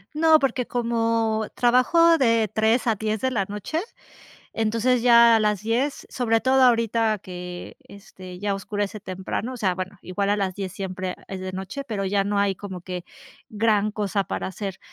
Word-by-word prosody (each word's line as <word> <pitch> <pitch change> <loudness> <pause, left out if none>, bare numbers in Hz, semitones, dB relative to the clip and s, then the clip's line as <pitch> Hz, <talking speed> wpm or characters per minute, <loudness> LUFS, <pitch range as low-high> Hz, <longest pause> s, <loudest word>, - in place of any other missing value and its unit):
No, 320 0 +5
porque 265 -3 0
como 230 -2 0
trabajo 325 +8 +4
de 230 - +2
3 220 +3 +2
a 225 - +3
10 215 +1 -2
de 260 - +1
la 210 -6 -1
noche, 210 - -3 0.7
entonces 230 +3 +1
ya 235 -1 +7
a - - +1
las 210 -2 +1
10, 245 +6 -1
sobre 225 -3 0
todo 265 0 +3
ahorita 230 -3 +2
que, 180 -1 -8
este, 185 -3 -12
ya 200 0 -1
oscurece 205 +1 -4
temprano. 190 +6 -5
O - - -7
sea, 190 -5 0
bueno, 185 +1 -6
igual 200 +2 -2
a 205 - +1
las 190 -2 -2
10 195 -2 -4
siempre 185 -2 -4
es 190 - -6
de 185 0 -5
noche, 190 +10 -5
pero 200 -5 -3
ya 195 +1 +1
no 205 0 0
hay 200 -1 +1
como 190 -3 -8
que 180 -1 -6 0.4
gran 215 -1 +1
cosa 205 -1 -1
para - - -3
hacer, 190 0 -6
215 Hz, 180 wpm, -24 LUFS, 195-235 Hz, 0.7 s, ya